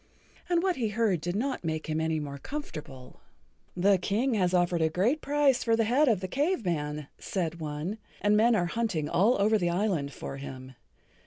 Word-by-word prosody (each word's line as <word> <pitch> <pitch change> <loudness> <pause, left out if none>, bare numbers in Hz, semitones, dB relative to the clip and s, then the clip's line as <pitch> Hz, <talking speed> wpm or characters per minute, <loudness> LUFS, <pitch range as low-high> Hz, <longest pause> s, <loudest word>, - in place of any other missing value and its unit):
And 345 -1 +2
what 375 -2 +1
he 235 -4 0
heard 210 -5 +1
did 175 +2 -3
not 260 +2 -2
make 160 -1 -2
him 155 0 -1
any 160 -1 0
more 140 -2 -6
comfortable. 150 - -8 0.6
"The 195 +1 +4
King 220 +8 0
has 185 -5 +2
offered 175 -2 +2
a 160 - +3
great 210 - +1
price 285 -2 +2
for 230 -1 +3
the 225 - +2
head 260 +7 +3
of 215 -7 +2
the 185 - -3
Cave 280 - 0
Man," 150 -4 -2
said 170 -3 -3
one, 155 +7 -4 0.2
"and 205 0 +3
men 230 +2 +4
are 180 -4 +2
hunting 175 -5 -1
all 205 +9 +3
over 215 +2 +3
the 175 -2 +1
island 175 -6 0
for 135 - -7
him. 130 -1 -8
190 Hz, 195 wpm, -28 LUFS, 160-230 Hz, 0.6 s, The